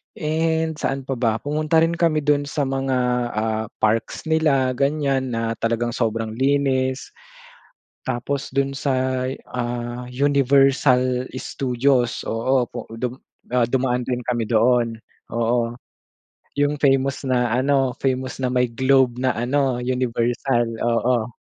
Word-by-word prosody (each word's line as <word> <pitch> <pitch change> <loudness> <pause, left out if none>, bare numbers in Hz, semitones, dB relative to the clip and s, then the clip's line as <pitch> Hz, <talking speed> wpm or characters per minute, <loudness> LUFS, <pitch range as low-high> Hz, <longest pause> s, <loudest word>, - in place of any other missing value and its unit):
And 160 +1 0
saan 135 -3 -3
pa 135 - -1
ba? 115 -2 0
Pumunta 155 +2 +1
rin 165 +1 +2
kami 165 -2 +2
dun 145 -1 +2
sa 145 +1 -1
mga, 135 -1 -1 0.3
ah, 110 0 -1
parks 110 +7 0
nila 150 -5 +2
ganyan 140 -1 0
na 115 0 -1
talagang 115 +1 0
sobrang 110 -1 -1
linis. 130 0 +1 1.0
Tapos 135 +3 -3
do'n 135 +1 0
sa, 130 -1 -1 0.2
ah, 120 0 -3
Universal 135 -2 +3
Studios, 125 -1 0
oo, 125 +3 +1
pu - - -7 0.2
dum 125 0 -2 0.4
ah, 125 - +4
dumaan 125 0 0
rin 125 -1 -2
kami 120 -2 0
doon. 115 0 +2 0.4
Oo, 115 0 0 0.8
'yong 145 +1 +2
famous 135 -1 +2
na 125 -2 +1
ano 135 0 +2
famous 130 -1 -1
na 125 - +1
may 125 0 +3
globe 130 +1 +3
na 130 - +2
ano 130 +1 +1
Universal, 120 0 0 0.2
oo. 120 0 +1
130 Hz, 125 wpm, -22 LUFS, 120-140 Hz, 1.0 s, ah